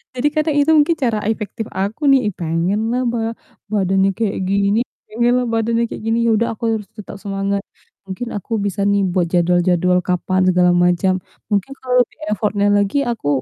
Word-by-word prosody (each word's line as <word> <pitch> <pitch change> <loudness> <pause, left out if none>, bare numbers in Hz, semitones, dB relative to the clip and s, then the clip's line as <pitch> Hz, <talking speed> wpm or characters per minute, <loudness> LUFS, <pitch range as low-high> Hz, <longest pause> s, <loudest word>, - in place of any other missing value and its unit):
Jadi, 250 +4 +1
kadang 310 -1 +1
itu 290 +2 +3
mungkin 305 +2 +4
cara 235 -5 +1
efektif 220 +1 -3
aku 200 +8 -3
nih, 270 - +6
ih, 205 - -2
pengenlah 195 +9 -1
ba 235 0 -1 0.5
badannya 195 -1 +2
kayak 220 -3 -1
gini 200 +2 +2 0.3
pengenlah 240 +3 +1
badannya 230 +1 +1
kayak - - -7
gini, 225 +1 +1
ya, - - +4
udah 230 +2 +1
aku 230 - -14
harus 210 -2 -6
tetap 210 -2 -9
semangat, 200 0 -1 0.5
mungkin 195 +6 -5
aku 205 +3 -7
bisa, 200 0 -1
nih, 200 -1 +2
buat 175 -1 +1
jadwal-jadwal 180 0 +2
kapan 185 +1 0
segala 180 -1 +4
macam, 180 +2 +2 0.4
mungkin 205 +5 0
kalau 255 -1 -3
lebih 245 - -1
effort-nya 205 -1 0
lagi 205 +4 +2
aku 225 -11 -5
205 Hz, 175 wpm, -19 LUFS, 190-230 Hz, 0.5 s, nih